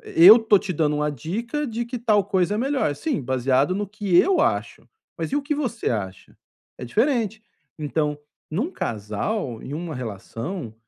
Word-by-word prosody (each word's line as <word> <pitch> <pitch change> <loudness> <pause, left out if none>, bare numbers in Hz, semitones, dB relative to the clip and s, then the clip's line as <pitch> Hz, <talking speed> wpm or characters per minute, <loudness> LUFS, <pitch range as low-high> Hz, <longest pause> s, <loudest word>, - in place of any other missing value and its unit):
eh, - - -12 0.2
"eu 225 - +10
tô 220 -3 +4
te 190 - -4
dando 150 -2 +1
uma 150 0 0
dica 230 - -3
de 235 -1 -3
que 240 +1 -5
tal 210 -4 +2
coisa 190 -1 +1
é - - -1
melhor". 260 - 0
"Sim, 280 - -2
baseado 130 +5 +1
no 205 +1 -2
que 200 -3 -1
eu 375 - +5
acho, - - -1 0.3
mas - - -3
e 285 - +2
o 290 - 0
que 295 +1 -1
você 250 -6 -2
acha?". 95 -5 -5 0.4
É - - -6
diferente. 225 - 0 0.4
Então, 150 0 -1 0.3
num 215 - -1
casal, 115 - -3
em 140 - -6
uma 165 0 -5
relação, 115 - -6
185 Hz, 180 wpm, -23 LUFS, 135-230 Hz, 0.4 s, eu